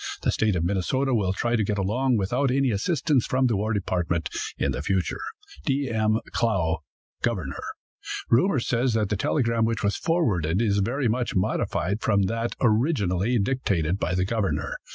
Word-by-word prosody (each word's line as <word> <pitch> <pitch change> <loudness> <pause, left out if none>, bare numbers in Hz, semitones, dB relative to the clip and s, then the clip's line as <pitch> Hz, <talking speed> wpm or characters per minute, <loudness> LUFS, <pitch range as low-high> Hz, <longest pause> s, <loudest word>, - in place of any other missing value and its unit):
The - - +2
State 110 -3 +1
of 85 - 0
Minnesota 100 +9 0
will 100 -6 +1
try 120 +5 0
to 110 - +2
get 105 0 -1
along 120 +6 +1
without 125 +8 +1
any 135 0 +2
assistance 135 - +1
from 130 0 +2
the 120 -3 +2
war 105 +3 -1
department 90 -5 -1 0.3
in - - 0
the - - -3
future. 95 -4 -1 0.4
"D. 135 - 0
M. 110 -1 +2
CLOUGH, 85 -9 +1 0.4
"Governor." - - -2 0.7
Rumor 140 +5 +3
says 120 0 0
that 105 -3 +1
the 105 - +1
telegram 115 +2 +1
which 115 -1 0
was 100 0 +1
forwarded 100 - +1
is 105 -3 +2
very 125 +6 0
much 120 +2 -1
modified 95 +2 0
from 100 -2 +2
that 115 +4 -2
originally 110 - +2
dictated 100 -7 0
by 90 - -1
the 90 0 +1
governor. 105 -1 -1
110 Hz, 170 wpm, -25 LUFS, 95-125 Hz, 0.7 s, Rumor